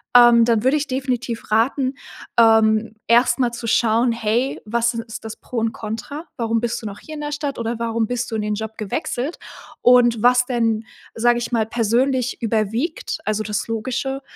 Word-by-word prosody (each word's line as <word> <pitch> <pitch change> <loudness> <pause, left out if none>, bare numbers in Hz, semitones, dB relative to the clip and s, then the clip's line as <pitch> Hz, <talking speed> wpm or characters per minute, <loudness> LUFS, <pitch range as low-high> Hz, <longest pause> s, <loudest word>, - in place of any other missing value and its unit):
ähm, 240 -1 +8
dann 225 -2 +2
würde 265 +4 +3
ich 295 -1 -3
definitiv 255 -4 -3
raten, 255 +4 +2 0.5
ähm, 220 -1 +4
erst 240 +1 +4
mal 245 -2 +2
zu 235 0 -6
schauen: 230 +1 +3
„Hey, 230 +3 -1
was 235 +2 0
is 230 - -2
ist 225 0 -9
das 220 - -7
Pro 250 - -8
und 225 0 +1
Contra? 230 +9 -6
Warum 230 -1 0
bist 235 0 -2
du - - -10
noch 205 0 -8
hier 310 - -11
in 300 - -6
der 295 0 -4
Stadt 290 -3 -3
oder 230 0 -2
warum 230 -1 -1
bist 245 0 -3
du - - -2
in 220 - -1
den 210 0 -1
Job 220 +1 -6
gewechselt?“ 245 - -3 0.4
Und 240 -2 +5
was 250 0 +5
denn, 230 -3 0 0.3
sage 240 +1 +3
ich 240 - -5
mal, 225 -2 +2
persönlich 240 +3 0
überwiegt 225 - -1
also 215 +1 -1
das 210 -1 -3
Logische, 260 +4 -3
235 Hz, 190 wpm, -21 LUFS, 225-250 Hz, 0.5 s, ähm